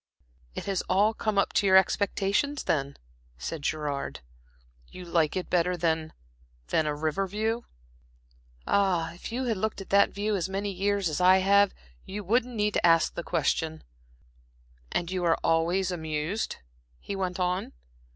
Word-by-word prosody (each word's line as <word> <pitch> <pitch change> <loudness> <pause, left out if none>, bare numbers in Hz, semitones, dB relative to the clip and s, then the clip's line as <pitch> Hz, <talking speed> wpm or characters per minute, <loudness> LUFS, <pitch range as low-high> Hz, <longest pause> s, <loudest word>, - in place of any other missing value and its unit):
"It - - -5
has 195 -2 0
all 205 +4 +3
come 215 -2 -2
up 200 - +2
to 200 - +2
your 190 0 +7
expectations, 200 +8 +1
then?" 140 -2 -1 0.4
said 160 - -5
Gerard. 145 - -3 0.7
"You 180 - -10
like 170 -1 +1
it 185 - -3
better 180 0 +1
than 160 -2 -1 0.6
a - - +4
the 150 -1 -1
river 155 +6 -1
view?" 220 +4 -2 1.0
"Ah, 180 -5 +1
if 175 - -8
you 250 +3 -2
had 230 -5 0
looked 215 +2 -2
at 195 - -9
that 200 0 +5
view 205 +1 -1
as 185 -1 -2
many 200 +1 -2
years 200 0 0
as 155 +2 -2
I 185 +1 +7
have, 200 +1 +4 0.3
you 205 +2 -6
wouldn't 240 +5 +1
need 210 -1 +1
to - - 0
ask 165 -1 +4
the - - -4
question." 160 -1 -1 1.1
"And 175 0 -1
you 185 -1 -2
are 165 -1 +3
always 175 +3 +2
amused?" 160 +4 -2 0.4
he 200 - -5
went 185 -1 -3
on. 180 +1 -1
185 Hz, 160 wpm, -28 LUFS, 165-200 Hz, 1.1 s, your